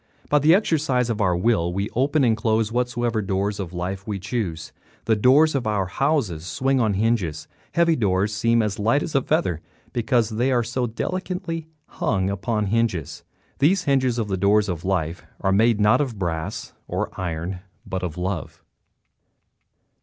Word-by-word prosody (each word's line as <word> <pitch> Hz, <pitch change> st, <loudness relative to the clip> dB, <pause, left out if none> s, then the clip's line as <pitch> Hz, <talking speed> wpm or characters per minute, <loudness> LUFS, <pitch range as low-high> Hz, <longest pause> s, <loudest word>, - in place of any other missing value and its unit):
By 150 Hz, -, +4 dB
the 155 Hz, +4 st, +6 dB
exercise 140 Hz, -, +1 dB
of 110 Hz, -1 st, -2 dB
our 90 Hz, -3 st, +2 dB
will 90 Hz, -4 st, +1 dB
we 100 Hz, +3 st, -2 dB
open 140 Hz, +4 st, +1 dB
and 115 Hz, -3 st, +3 dB
close 110 Hz, 0 st, 0 dB
whatsoever 120 Hz, -2 st, 0 dB
doors 100 Hz, +1 st, -1 dB
of 90 Hz, -4 st, -4 dB
life 95 Hz, +3 st, -4 dB
we 105 Hz, -2 st, -2 dB
choose. 95 Hz, -5 st, -4 dB, 0.3 s
The 110 Hz, +1 st, +3 dB
doors 140 Hz, +8 st, +5 dB
of 130 Hz, -5 st, -1 dB
our 105 Hz, -3 st, +1 dB
houses 110 Hz, -, 0 dB
swing 130 Hz, +11 st, +1 dB
on 110 Hz, -4 st, +2 dB
hinges. 100 Hz, -7 st, 0 dB, 0.3 s
Heavy 170 Hz, -1 st, +3 dB
doors 100 Hz, -3 st, +1 dB
seem 115 Hz, +2 st, +2 dB
as 105 Hz, -2 st, -2 dB
light 115 Hz, +8 st, +2 dB
as -, -, -5 dB
a 135 Hz, -, +3 dB
feather 130 Hz, -, 0 dB, 0.3 s
because 120 Hz, -2 st, +1 dB
they 120 Hz, +5 st, +1 dB
are 120 Hz, -2 st, +2 dB
so 120 Hz, +2 st, -2 dB
delicately 165 Hz, -, -4 dB, 0.2 s
hung 95 Hz, -4 st, -1 dB
upon 105 Hz, +2 st, -1 dB
hinges. 100 Hz, -8 st, -1 dB, 0.4 s
The 150 Hz, +8 st, +5 dB
hinges 135 Hz, -9 st, +1 dB
of 115 Hz, -3 st, -1 dB
the 95 Hz, -2 st, -1 dB
doors 100 Hz, +2 st, +3 dB
of 85 Hz, -3 st, -4 dB
life 90 Hz, -3 st, -1 dB, 0.2 s
are 95 Hz, -, +1 dB
made 110 Hz, +2 st, +3 dB
not 105 Hz, +7 st, +4 dB
of 125 Hz, -7 st, -3 dB
brass 80 Hz, -4 st, -4 dB
or -, -, -2 dB
iron, 90 Hz, +1 st, -4 dB, 0.3 s
but 95 Hz, -, -4 dB
of 90 Hz, -3 st, -4 dB
love. 90 Hz, -3 st, -4 dB
110 Hz, 170 wpm, -23 LUFS, 95-125 Hz, 0.4 s, the